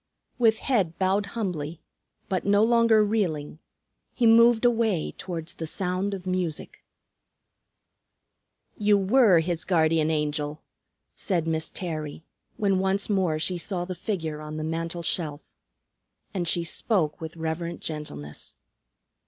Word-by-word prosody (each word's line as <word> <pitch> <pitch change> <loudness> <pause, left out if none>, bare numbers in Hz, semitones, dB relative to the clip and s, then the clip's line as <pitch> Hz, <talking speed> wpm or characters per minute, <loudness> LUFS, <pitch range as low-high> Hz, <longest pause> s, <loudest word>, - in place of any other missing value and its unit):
With 225 -2 +4
head 195 -11 +1
bowed 195 +2 +1
humbly, 170 -7 -3 0.5
but 185 -2 -1
no 205 +1 +4
longer 230 -1 +5
reeling, 165 -9 -1 0.6
he 245 - +2
moved 230 +1 +6
away 225 -8 +2
towards 170 -3 -5
the 160 - -5
sound 185 +4 -1
of 185 -1 -9
music. 185 - -3 2.0
"You 210 -1 +4
were 200 -3 +5
his 170 0 -2
Guardian 160 -3 +2
Angel," 150 -1 -2 0.5
said 175 -5 -1
Miss 160 -1 -1
Terry, 155 -4 -5 0.3
when 195 -2 +2
once 195 +2 0
more 185 -6 +1
she 175 +3 0
saw 175 0 -2
the 185 - -4
figure 160 -5 -3
on 155 0 -6
the 155 - -3
mantel 165 +2 -3
shelf. 155 -3 -2 0.9
And 180 -3 -2
she 170 +1 +1
spoke 170 -2 0
with 160 +1 -7
reverent 165 +1 -3
gentleness. 75 - -7
175 Hz, 130 wpm, -26 LUFS, 160-205 Hz, 2.0 s, moved